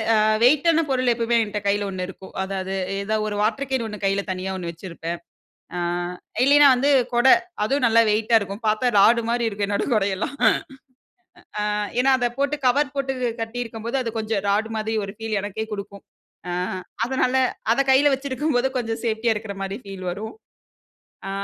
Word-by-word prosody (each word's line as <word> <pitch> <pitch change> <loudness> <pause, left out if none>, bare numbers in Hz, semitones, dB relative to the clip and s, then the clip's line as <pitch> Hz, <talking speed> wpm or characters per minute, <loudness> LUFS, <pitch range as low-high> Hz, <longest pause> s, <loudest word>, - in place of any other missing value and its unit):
அ - - +4 0.3
வெயிட்டான 315 +5 +4
பொருள் 255 -2 +2
எப்பவுமே, 235 0 +1
என்ட்ட 210 0 -4
கையில 205 0 +1
ஒண்ணு 185 -1 -4
இருக்கும். 190 0 -12
அதாவது 190 0 -4 0.3
ஏதாவது 215 +1 -1
ஒரு 205 - -4
வாட்டர் 235 +6 -1
கேன் 260 -3 0
1 210 -1 -8
கையில 195 0 +1
தனியா 185 +1 -3
1 170 -2 -4
வச்சிருப்பேன். 170 -1 -6 0.6
அ - - -2 0.7
இல்லைனா 290 +1 +7
வந்து, 275 +3 +1 0.2
கொட 240 +2 +3 0.4
அதுவும் 270 +5 0
நல்லா 230 0 +5
வெயிட்டா 220 +2 +3
இருக்கும். 200 +2 -6
பார்த்தா 220 +3 +1
ராடு 235 +4 +5
மாரி 235 0 +1
இருக்கும் 200 -1 -2
என்னோட 200 - -1
கொடையெல்லாம். 200 +3 -1 1.4
அ - - 0 0.3
ஏன்னா 265 +1 +4
அத 245 -1 +1
போட்டு 280 +1 +1
கவர் 285 +3 +2
போட்டு 270 -1 -1 0.3
கட்டியிருக்கும்போது, 230 +1 -4
அது 230 - -3
கொஞ்சம் 215 -2 -2
ராடு 215 +3 +1
மாதிரி 220 +1 -2
ஒரு 195 - -8
ஃபீல் 225 -2 -2
எனக்கே 205 +2 -4
குடுக்கும். 200 0 -7 0.5
அ - - -2 0.5
அதனால 260 0 0 0.4
அத - - -2
கையில 280 +2 +5
வச்சிருக்கும்போது, 265 -1 -1
கொஞ்சம் 225 -1 -3
சேஃப்டியா 225 +1 +1
இருக்குற 210 -2 -6
மாதிரி 195 +1 -4
ஃபீல் 195 -2 -8
வரும். 215 +4 -6 0.9
ஆ - - -3
220 Hz, 165 wpm, -23 LUFS, 200-250 Hz, 1.4 s, இல்லைனா